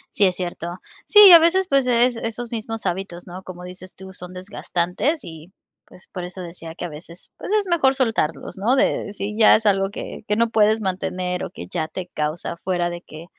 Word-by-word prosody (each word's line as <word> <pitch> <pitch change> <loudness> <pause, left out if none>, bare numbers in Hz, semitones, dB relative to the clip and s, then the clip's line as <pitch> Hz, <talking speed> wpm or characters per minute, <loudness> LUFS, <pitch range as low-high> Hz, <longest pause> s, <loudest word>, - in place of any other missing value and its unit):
Sí, 205 - +4
es 185 -1 +1
cierto. 175 0 -5 0.3
Sí, 420 - +6
y 360 - +10
a 335 - +11
veces, 365 +3 +3
pues 275 -5 +2
es, 245 0 +3
esos 230 +1 -5
mismos 225 -2 -5
hábitos, 180 -1 -4
¿no? 185 +2 -9
Como 180 -1 -9
dices 185 0 -10
tú, 190 0 -11
son 180 0 -9
desgastantes 185 - -2
y 160 +2 -11 0.3
pues, 180 - -18
por 180 -2 -7
eso 180 +1 -8
decía 170 -2 -9
que 175 - -6
a - - -3
veces, 165 +3 -12
pues - - -7
es 400 - -5
mejor 295 -6 +3
soltarlos, 220 - -1
¿no?, 225 +7 +2
de 205 - +1
si 210 +1 -5
ya 220 - +7
es 220 - -9
algo 195 -1 +2
que - - -7
que 210 - +1
no 230 0 +2
puedes 220 0 +3
mantener 180 -1 -2
o - - -7
que 90 - -9
ya 155 -1 -2
te 185 -1 -6
causa 155 +3 -3
fuera 175 -2 0
de 175 0 -7
que 155 -1 -12
190 Hz, 220 wpm, -22 LUFS, 175-225 Hz, 0.3 s, a